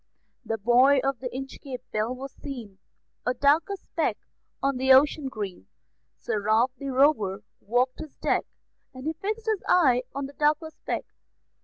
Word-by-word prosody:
The 225 - -2
buoy 250 +6 +5
of 270 -2 0
the 250 - -4
Inchcape 270 0 -7
Bell 220 +4 -1
was 270 +1 -7
seen, 235 -9 -8 0.4
A 250 - 0
darker 300 +9 +3
speck - - -2 0.4
on 275 -1 0
the 265 +1 +3
ocean 275 +1 +5
green; 195 - -6 0.5
Sir 210 - -2
Ralph 220 +5 +3
the 275 - -4
Rover 255 -8 +2 0.2
walked 245 +4 0
his 310 -2 -8
deck, - - 0 0.5
And 260 +1 -8
he 315 - 0
fixed 425 +7 -4
his 435 -3 0
eye 260 -9 +5
on 280 0 -2
the 275 - -9
darker 300 +2 +1
speck. 315 - -4
265 Hz, 160 wpm, -26 LUFS, 240-295 Hz, 0.5 s, buoy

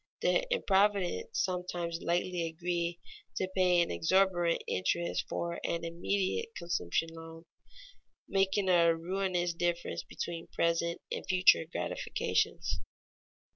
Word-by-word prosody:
The - - +2
improvident 205 - +1
sometimes 175 -2 -2
lightly 175 0 0
agree 170 +1 -2 0.4
to 190 - 0
pay 180 -2 +4
an - - -4
exorbitant 175 -1 +2
interest 170 - -1
for 170 0 -3
an 170 0 -2
immediate 195 - -1
consumption 165 - -1
loan, 165 0 -10 0.8
making 195 0 +1
a 170 -2 +5
ruinous 175 0 -1
difference 175 0 -1
between 170 -1 -6
present 170 0 0
and - - -3
future 185 -3 +5
gratifications. - - -1
175 Hz, 105 wpm, -31 LUFS, 170-190 Hz, 0.8 s, a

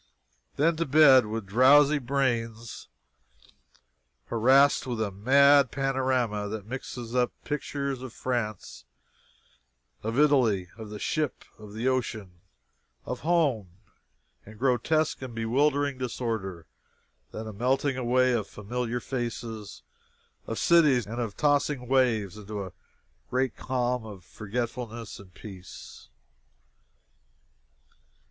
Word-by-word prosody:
Then 160 +3 +2
to 165 - 0
bed, 135 -5 +6
with 110 -1 -4
drowsy 140 +8 +5
brains 120 -4 -2 1.4
harassed 130 +5 +4
with 120 -3 -3
a 110 -2 -1
mad 140 +6 +5
panorama 130 -6 -1
that 105 -1 -6
mixes 120 -1 -7
up 125 -1 +2
pictures 140 -2 -3
of 130 -2 -7
France, 115 -5 -4 1.2
of 115 +3 -3
Italy, 125 -11 +3
of 110 -2 -9
the 105 - -7
ship, 150 +6 -2
of 105 -1 -11
the 115 +4 -2
ocean, 110 -8 -2 0.6
of 125 - -4
home, 145 - +1 0.7
in 110 +1 -14
grotesque 135 +6 +1
and 125 -3 -7
bewildering 140 +4 +1
disorder. 110 -8 -4 0.7
Then 110 - -6
a 110 - -7
melting 130 +5 0
away 130 0 +2
of 110 -4 -1
familiar 120 +3 -4
faces, 115 -4 -5 0.6
of 115 - -4
cities, 150 -9 +4
and 115 +3 -4
of 110 -4 -5
tossing 145 -3 +1
waves, 115 -7 +1
into 105 -1 -6
a 95 - -10 0.6
great 130 -1 0
calm 125 -1 -1
of 95 -4 -11
forgetfulness 115 +1 -5
and 100 -2 -14
peace. 95 - -12
120 Hz, 110 wpm, -27 LUFS, 110-135 Hz, 1.4 s, bed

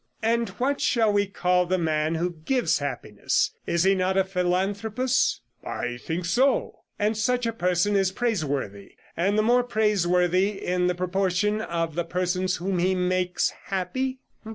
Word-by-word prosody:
'And 230 0 +1
what 275 +3 0
shall 225 -4 +2
we 205 0 +2
call 180 -2 +1
the 185 +1 +1
man 155 -1 0
who 175 +2 -1
gives 255 +4 +1
happiness? 125 -7 -1 0.2
Is 170 0 +1
he 195 +1 +4
not 190 0 0
a 190 - +4
philanthropist?' 200 +7 0 0.2
'I 120 0 -4
think 170 +2 -3
so.' 255 +11 +1 0.2
'And 210 +2 +1
such 245 +3 0
a 230 - -1
person 180 0 +1
is 195 -1 +2
praiseworthy, 145 - -3 0.2
and 195 +5 +1
the 215 - +3
more 245 +3 +4
praiseworthy 195 -4 +1
in 180 0 +1
the 180 - 0
proportion 190 +3 0
of 165 -5 -2
the 175 +2 -1
persons 180 +1 -1
whom 185 0 -2
he 185 +2 +2
makes 180 0 0
happy? 230 +8 -2
185 Hz, 155 wpm, -25 LUFS, 175-215 Hz, 0.2 s, he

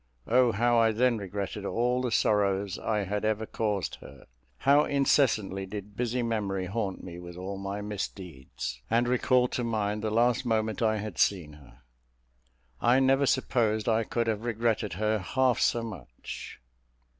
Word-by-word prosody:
O 125 0 +4
how 120 +2 +2
I 115 -1 +4
then 120 0 +2
regretted 100 +1 -5
all 125 +4 0
the 125 - -1
sorrows 100 -2 +1
I 105 -2 -1
had 100 +2 -3
ever 110 0 0
caused 105 -4 -2
her; - - -13 0.3
how 140 +2 +4
incessantly 115 -9 +1
did 100 +1 -8
busy 125 +1 -1
memory 100 -5 -1
haunt 95 0 -3
me 85 -1 -8
with 85 0 -10
all 95 +2 -5
my 100 +1 -4
misdeeds, 85 -11 -6
and 120 +2 +2
recall 125 0 +3
to 125 - -2
mind 105 -2 -1
the 110 - -1
last 120 +2 +2
moment 110 -2 -1
I 110 -1 +2
had 105 -3 -6
seen 85 -7 +1
her! 70 -4 -17 1.0
I 120 +2 +4
never 135 +1 +3
supposed 110 -5 +1
I 115 0 +2
could 115 +1 -1
have 110 -1 -1
regretted 115 -4 -1
her 110 +3 0
half 125 +6 +1
so 120 - +2
much. 100 - -8
110 Hz, 160 wpm, -28 LUFS, 100-120 Hz, 1.0 s, O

